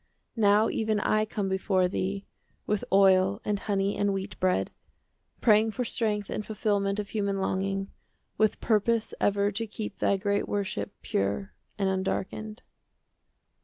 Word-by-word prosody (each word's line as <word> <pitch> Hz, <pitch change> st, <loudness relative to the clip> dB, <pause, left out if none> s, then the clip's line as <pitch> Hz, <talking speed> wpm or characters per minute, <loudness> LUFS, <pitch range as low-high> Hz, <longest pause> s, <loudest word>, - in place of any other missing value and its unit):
Now 210 Hz, -1 st, +4 dB
even 220 Hz, -1 st, 0 dB
I 215 Hz, +1 st, +2 dB
come 210 Hz, -2 st, -3 dB
before 190 Hz, -1 st, +1 dB
thee 195 Hz, +2 st, -3 dB, 0.4 s
With 210 Hz, -1 st, 0 dB
oil 195 Hz, 0 st, +5 dB
and 205 Hz, -1 st, 0 dB
honey 200 Hz, -1 st, 0 dB
and 205 Hz, -1 st, +1 dB
wheat 195 Hz, -1 st, -5 dB
bread, 185 Hz, 0 st, +1 dB, 0.7 s
Praying 220 Hz, -1 st, +5 dB
for 230 Hz, +4 st, -3 dB
strength 210 Hz, -4 st, -1 dB
and 210 Hz, -, -3 dB
fulfilment 205 Hz, -2 st, 0 dB
Of 205 Hz, -1 st, -3 dB
human 200 Hz, -2 st, -1 dB
longing, 195 Hz, +1 st, -1 dB, 0.4 s
with 215 Hz, -1 st, +2 dB
purpose 225 Hz, +1 st, +1 dB
10 -, -, +3 dB
Ever 200 Hz, 0 st, +1 dB
to 225 Hz, +3 st, -3 dB
keep 210 Hz, -1 st, -6 dB
thy 200 Hz, -, +2 dB
great 200 Hz, +1 st, 0 dB
worship 190 Hz, -, -2 dB
Pure 100 Hz, -, -1 dB, 0.2 s
and 195 Hz, -2 st, +1 dB
undarkened. 195 Hz, +3 st, -3 dB
200 Hz, 145 wpm, -28 LUFS, 195-215 Hz, 0.7 s, oil